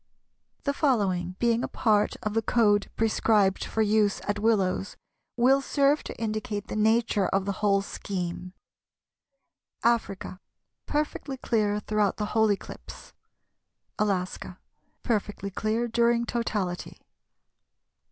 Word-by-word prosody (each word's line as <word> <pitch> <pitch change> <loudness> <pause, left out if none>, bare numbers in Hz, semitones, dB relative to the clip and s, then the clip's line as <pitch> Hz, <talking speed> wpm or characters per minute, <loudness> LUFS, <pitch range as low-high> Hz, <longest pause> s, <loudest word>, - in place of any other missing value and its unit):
The 280 - 0
following, 195 - +1
being 235 +1 +1
a - - -1
part 210 -2 +1
of 215 - -2
the 225 - +2
code 210 -3 +2
prescribed 215 -3 +2
for 220 - 0
use 210 -1 +2
at 205 0 -1
Willows, 200 -3 +1 0.4
will 265 +3 +4
serve 280 +2 +2
to - - -7
indicate 215 -1 -3
the - - -4
nature 220 -2 +2
of 195 0 0
the 200 - 0
whole 200 -1 +3
scheme:— 180 -2 -5 1.3
Africa, 220 -5 0 0.5
Perfectly 295 -2 -2
clear 210 -4 0
throughout 210 -2 0
the 210 - -1
whole 220 -1 +4
eclipse. 200 - -7 0.9
Alaska, 185 -3 -2 0.5
Perfectly 205 -3 -2
clear 220 +4 -1
during 235 0 +2
totality. 210 -7 -3
215 Hz, 115 wpm, -27 LUFS, 200-235 Hz, 1.3 s, will